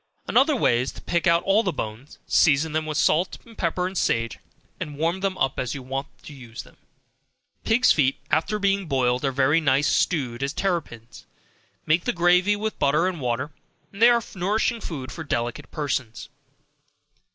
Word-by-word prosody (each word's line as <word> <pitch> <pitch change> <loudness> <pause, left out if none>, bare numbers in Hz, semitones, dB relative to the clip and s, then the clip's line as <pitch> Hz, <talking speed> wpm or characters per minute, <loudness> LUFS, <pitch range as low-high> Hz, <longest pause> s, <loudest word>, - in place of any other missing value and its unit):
Another 280 +3 +3
way 120 - +2
is 130 - -3
to - - -11
pick 170 +1 0
out 170 +1 +4
all 195 +3 +3
the 190 - -1
bones, 115 -1 -7
season 150 +1 +3
them 155 0 -2
with 155 -1 -3
salt, 170 +3 +2 0.2
pepper 180 +1 -1
and 185 +1 -4
sage, 115 - 0 0.4
and 145 -1 -6
warm 165 +4 0
them 195 -1 -2
up 135 - 0
as 125 +1 -2
you 135 - -7
want 135 +2 -4 0.2
to 150 - -10
use 120 -4 -9
them. - - -19 0.9
Pigs' 240 +3 +4
feet, 135 -3 +2
after 165 +7 +1
being 200 -2 0
boiled, 130 -2 +1
are 135 - +1
very 140 +5 +2
nice 140 0 +2
stewed 130 -8 0
as 140 +1 -2
terrapins, 145 - -4 0.6
make 160 +3 +2
the - - 0
gravy 180 +3 +3
with 215 +1 -4
butter 150 +5 +2
and 175 -5 -4
water, 125 +4 -2 0.4
they 225 +4 +5
are 235 -1 +3
nourishing 215 +5 0
food 135 -8 -6
for 160 - -7
delicate 120 -5 -3
persons. 135 -7 -4
155 Hz, 175 wpm, -24 LUFS, 130-185 Hz, 0.9 s, they